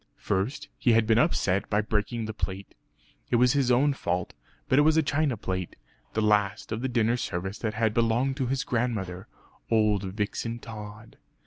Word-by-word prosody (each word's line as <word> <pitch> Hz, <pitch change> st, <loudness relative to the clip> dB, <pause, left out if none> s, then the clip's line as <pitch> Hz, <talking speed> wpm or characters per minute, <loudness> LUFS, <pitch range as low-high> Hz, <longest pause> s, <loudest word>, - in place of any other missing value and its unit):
First 100 Hz, +9 st, -2 dB
he 120 Hz, -, +4 dB
had 115 Hz, 0 st, +4 dB
been 110 Hz, +1 st, +4 dB
upset 100 Hz, -, +1 dB
by 105 Hz, +1 st, +2 dB
breaking 110 Hz, +2 st, -2 dB
the 110 Hz, -, -5 dB
plate. 100 Hz, -2 st, -5 dB, 0.6 s
It -, -, +2 dB
was 125 Hz, +2 st, +4 dB
his 140 Hz, -3 st, +2 dB
own 135 Hz, +4 st, +4 dB
fault; 90 Hz, -8 st, -2 dB, 0.3 s
but 130 Hz, -, +4 dB
it -, -, +7 dB
was 155 Hz, +1 st, +4 dB
a 160 Hz, -, +4 dB
china 145 Hz, -4 st, 0 dB
plate, 95 Hz, -2 st, -4 dB, 0.4 s
the 110 Hz, -, 0 dB
last 105 Hz, -1 st, +1 dB
of 110 Hz, +1 st, -2 dB
the 130 Hz, -, -1 dB
dinner 120 Hz, 0 st, +2 dB
service 95 Hz, -1 st, -4 dB
that 110 Hz, -2 st, -2 dB
had 110 Hz, -1 st, +1 dB
belonged 120 Hz, +4 st, +1 dB
to 130 Hz, -4 st, -1 dB
his 135 Hz, +1 st, -1 dB
grandmother, 105 Hz, -8 st, -2 dB, 0.4 s
old 105 Hz, -3 st, +3 dB
Vixen 105 Hz, +4 st, -3 dB
Tod. 105 Hz, -1 st, -10 dB
110 Hz, 185 wpm, -27 LUFS, 105-125 Hz, 0.6 s, it